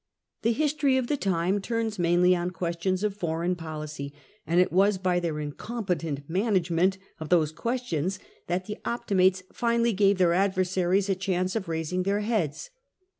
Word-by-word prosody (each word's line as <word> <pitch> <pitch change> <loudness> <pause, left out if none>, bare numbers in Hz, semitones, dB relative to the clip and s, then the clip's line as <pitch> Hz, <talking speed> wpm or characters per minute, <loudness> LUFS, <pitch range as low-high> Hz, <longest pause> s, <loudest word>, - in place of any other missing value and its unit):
The 230 - +2
history 290 -1 +2
of 260 - 0
the 290 - 0
time 190 -3 0
turns 225 -1 -2
mainly 175 +1 +4
on 175 0 -1
questions 180 +2 -2
of 210 -2 0
foreign 170 -2 -1
policy, 155 -4 -6 0.4
and 170 +2 +3
it 180 - +3
was 195 +2 +3
by 185 -1 +1
their 165 -3 -2
incompetent 160 -3 -3
manage 185 -1 +1
ment 185 +3 +2 0.2
of 155 -1 -6
those 160 -4 +3
questions 190 - -2 0.3
that 180 +2 -1
the 210 - -6
Optimates 190 -5 +1
finally 235 -1 +1
gave 200 0 +3
their 175 -2 +4
adversaries 185 0 +1
a 195 - +2
chance 185 0 -1
of 205 -5 -2
raising 160 +3 -1
their 200 +2 0
heads. 205 - -2
185 Hz, 165 wpm, -27 LUFS, 170-205 Hz, 0.4 s, mainly